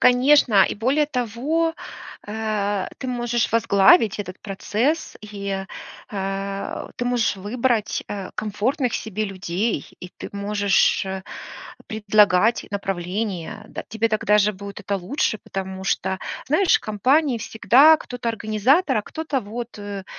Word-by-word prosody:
Конечно, 250 -5 +5
и - - -2
более 265 +8 +2
того, 290 +6 -1 0.5
э, 205 -2 -1
ты 260 - -5
можешь 240 -1 0
возглавить 220 - +4
этот 185 -2 -8
процесс, 220 +9 -1
и, 200 -2 -5 0.5
э, 195 0 -4
ты 245 - -2
можешь 245 -3 +1
выбрать, 225 +3 -1
э, 195 -2 -6
комфортных 235 - -1
себе 215 0 -3
людей, 190 -1 -2
и 180 - -9
ты - - -7
можешь, 200 0 +2
э, 190 0 -5 0.7
предлагать 210 0 +3
направление, 195 -1 -3
да. - - -7
Тебе 225 +1 0
тогда 215 -1 +2
же 210 +1 +3
будет 200 +1 -9
это 200 0 -2
лучше, 220 +4 -1
потому 190 -1 -6
что, 190 -1 -1 0.3
знаешь, 325 +7 +4
в - - -6
компании 255 +6 +2
всегда 270 +8 +5
кто-то 245 -4 -5
организатор, 230 - +2
а - - -2
кто-то 305 +1 -3
вот, 230 +2 -7
э, 200 -1 -6
215 Hz, 130 wpm, -22 LUFS, 200-245 Hz, 0.7 s, Конечно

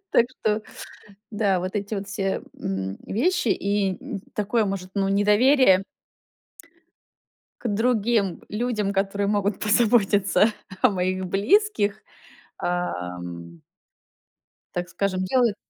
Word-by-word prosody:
Так 235 - +5
что 215 -4 -1 0.7
да, 205 -4 +1
вот 185 +1 -3
эти 205 +1 -3
вот 195 0 -5
все, 195 -1 -2 0.2
м, 95 0 -3
вещи 285 - +1
и, 200 -1 0
м, 195 - -6
такое, 215 +2 +1
может, 195 -2 -3
ну, 195 -1 0
недоверие 205 +1 +4 1.8
к - - -3
другим 220 -3 +1
людям, 215 -2 -1
которые 200 +1 0
могут 205 -1 0
позаботиться 210 -2 +3 0.3
о - - +6
моих 185 -1 -1
близких, 210 - +2 0.6
ам 90 - -4 1.1
так 175 0 -3
скажем, 185 -2 -1
делает. 235 +1 +2
200 Hz, 105 wpm, -24 LUFS, 185-215 Hz, 1.8 s, о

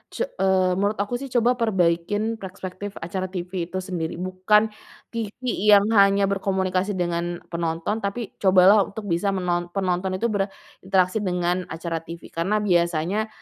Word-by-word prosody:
su - - 0
eee, 190 - +1
menurut 205 +2 +1
aku 245 +4 -4
sih 275 - -5
coba 240 +1 +4
perbaikin 205 +2 +1
perspektif 190 +1 -7
acara 185 +2 -3
TV 180 0 -5 0.2
itu 185 +1 -4
sendiri, 165 -3 -3
bukan 210 +4 +3 0.4
TV 225 -3 -4 0.4
yang 200 0 +7
hanya 200 -1 +5
berkomunikasi 190 0 0
dengan 175 -1 -1 0.3
penonton 170 +5 -2
tapi 200 +5 -2 0.2
cobalah 190 +2 +6
untuk 210 +1 -8
bisa 175 +4 +1
menon 175 -1 -1
penonton 185 0 0
itu 235 - 0
berinteraksi 195 -1 -1
dengan 180 0 0
acara 165 0 -3
TV 170 +1 -9
karena 175 +6 -1
biasanya, 175 +3 +1
190 Hz, 145 wpm, -24 LUFS, 175-205 Hz, 0.4 s, yang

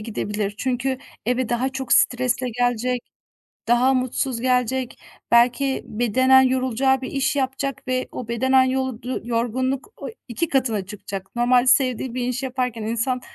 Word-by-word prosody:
gidebilir. 210 -2 -3
Çünkü 260 +1 -1 0.3
eve 250 0 0
daha 245 +2 0
çok 265 -1 -3
stresle 250 0 +2
gelecek, 245 +1 0 0.7
daha 250 +3 +4
mutsuz 255 -1 -1
gelecek, 255 0 0 0.3
belki 250 +3 +3
bedenen 260 +4 +4
yorulacağı 260 0 +1
bir 260 - -5
iş 275 +1 0
yapacak 270 0 -2
ve 255 0 -1
o 250 - -6
bedenen 260 +3 +3
yoldu 260 -1 -2
yorgunluk 255 - -1
oy - - -7 0.2
2 280 +7 -2
katına 230 -7 0
çıkacak. 195 0 -8
Normal 245 +1 +3
sevdiği 255 -1 +2
bir 250 -1 -2
iş 250 +1 -3
yaparken 250 -3 -2
insan 235 +3 -1
255 Hz, 140 wpm, -22 LUFS, 235-260 Hz, 0.7 s, daha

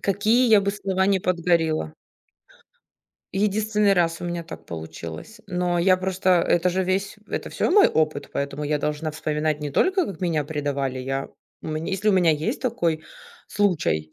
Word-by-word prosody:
какие 215 +6 +2
я 215 -2 +7
бы 200 - 0
слова 190 -2 0
не 195 -1 +2
подгорела. 170 - +1 1.4
Единственный 210 +1 +2
раз 170 -3 +1
у - - -5
меня 175 -1 -3
так 160 - -11
получилось. 80 - -8
Но 180 -1 -1
я 185 +2 +4
просто 185 0 -1
это 175 +1 +2
же 185 +1 0
весь, 190 +2 -1
это - - -4
всё - - -1
мой 400 +2 +7
опыт, 155 -2 0
поэтому 140 +1 -3
я 150 0 0
должна 150 +1 -2
вспоминать 150 0 -1
не 150 - -4
только, 375 - +2
как 190 -5 -7
меня 165 -4 0
предавали. 140 -3 -2
Я 135 +1 -3 0.3
мне 155 +4 -4
если 195 +3 0
у - - +5
меня 180 -4 +4
есть 160 - -2
такой 170 -11 -1 0.4
случай 150 - 0
175 Hz, 165 wpm, -24 LUFS, 150-195 Hz, 1.4 s, я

